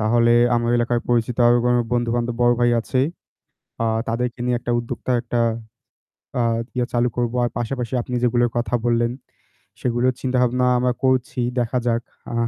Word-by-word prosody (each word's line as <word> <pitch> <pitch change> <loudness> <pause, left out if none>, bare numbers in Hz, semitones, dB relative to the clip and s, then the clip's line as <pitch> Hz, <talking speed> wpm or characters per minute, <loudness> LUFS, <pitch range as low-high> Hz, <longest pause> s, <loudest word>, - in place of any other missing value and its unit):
তাহলে 115 +2 +3 0.2
আমার 120 0 +1
এলাকায় 120 0 +1
পরিচিত 120 0 +1
আরও 120 0 +5
কোন 125 0 +3 0.2
বন্ধুবান্ধব, 120 0 0
বড় 120 0 +5
ভাই 120 0 +4
আছে। 130 +3 -1 0.8
আ - - +1 0.2
তাদেরকে 120 +1 -2
নিয়ে 125 -1 +1
একটা 120 - -4
উদ্যোক্তা 120 +2 -3
একটা 120 0 -2 1.0
আ - - +3 0.3
ইয়া 125 -1 +1
চালু 120 0 +2
করবো। 120 0 -1
আর 120 - -1
পাশাপাশি 120 +1 -3
আপনি 125 - -6
যেগুলোর 120 0 +2
কথা 120 -1 -1
বললেন 120 0 +2 0.7
সেগুলো 120 0 0
চিন্তাভাবনা 125 -1 +1
আমরা 125 0 +1
করছি। 130 -1 +1 0.2
দেখা 120 +1 0
যাক। 115 0 +1 0.3
আ - - -3
120 Hz, 160 wpm, -21 LUFS, 120-125 Hz, 1.0 s, আরও